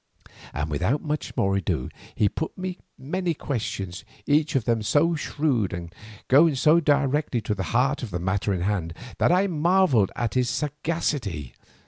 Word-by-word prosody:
And 75 +2 -3
without 95 - 0 0.3
more 95 0 +2
ado 95 - -1 0.3
he 105 - +3
put 160 +10 -4
me 185 -1 -5 0.2
many 170 +5 -2
questions, 100 - -4 0.2
each 150 +1 +2
of 125 -5 +1
them 115 -2 +1
so 150 +10 +2
shrewd 140 - -1
and 85 -1 -6 0.3
going 150 +3 +5
so 155 +5 +5
directly 145 -3 +1
to 105 - -1
the 100 - -4
heart 130 +5 +1
of 125 - -5
the 85 - -3
matter 95 +3 -1
in 95 -3 -1
hand, 90 -4 -1 0.2
that - - +4
I 185 +2 +4
marvelled 170 - +3
at 120 -3 -2
his 125 -2 +1
sagacity. 145 - -2
130 Hz, 160 wpm, -25 LUFS, 100-155 Hz, 0.3 s, going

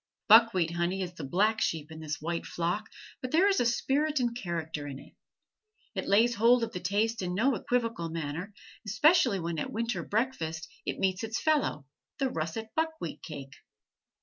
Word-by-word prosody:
Buckwheat 220 -6 +6
honey 175 +3 -1
is 180 -1 -6
the 165 - -8
black 210 +10 +1
sheep 160 -1 -1
in 160 - -8
this 155 -1 -4
white 170 +2 -3
flock, 180 +6 -2 0.3
but 255 - -3
there 335 +8 +4
is 395 -1 +3 0.2
spirit 295 +2 +1
and 240 -2 0
character 160 -8 -4
in 135 -2 -6
it. - - -14 0.8
It - - -3
lays 230 +4 +4
hold 235 +2 +4
of 230 - -2
the 180 - -3
taste 205 +5 0
in 180 -1 -2
no 255 +7 +3
equivocal 230 -8 -1
manner, 165 +4 -4 0.3
especially 235 - +4
when 165 -2 -3
at - - -2
a - - -10
winter 230 +1 -2
breakfast 170 -9 -2 0.2
it - - -1
meets 190 +1 0
its 225 0 -2
fellow, 300 - +1 0.3
the 270 -3 0
russet 165 +8 -3
buckwheat 320 - -2
cake. 140 -4 -8
200 Hz, 175 wpm, -29 LUFS, 165-235 Hz, 0.8 s, Buckwheat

